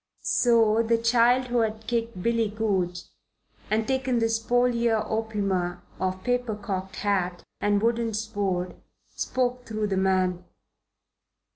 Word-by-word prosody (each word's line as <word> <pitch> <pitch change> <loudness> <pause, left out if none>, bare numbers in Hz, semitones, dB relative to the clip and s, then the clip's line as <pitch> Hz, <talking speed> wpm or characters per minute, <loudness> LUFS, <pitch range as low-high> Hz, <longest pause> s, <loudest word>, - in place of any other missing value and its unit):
So 230 -2 +4
the 230 0 +2
child 240 +2 +3
who 240 0 +1
had 220 -1 -1
kicked 230 -5 -2
Billy 230 -2 +1
Goodge 190 -5 -1 0.7
and 220 +1 +1
taken 265 -2 0
the 225 -1 +2
spolia 235 0 +2
opima 200 -5 -1 0.2
of 185 0 -2
paper 245 -3 0
cocked 195 -2 -5
hat 185 -4 -1 0.2
and 205 0 +1
wooden 230 -1 +1
sword 200 -5 -2 0.3
spoke 250 -1 -2
through 215 -1 -2
the 195 -2 -1
man. 185 -1 +1
220 Hz, 125 wpm, -26 LUFS, 190-235 Hz, 0.7 s, So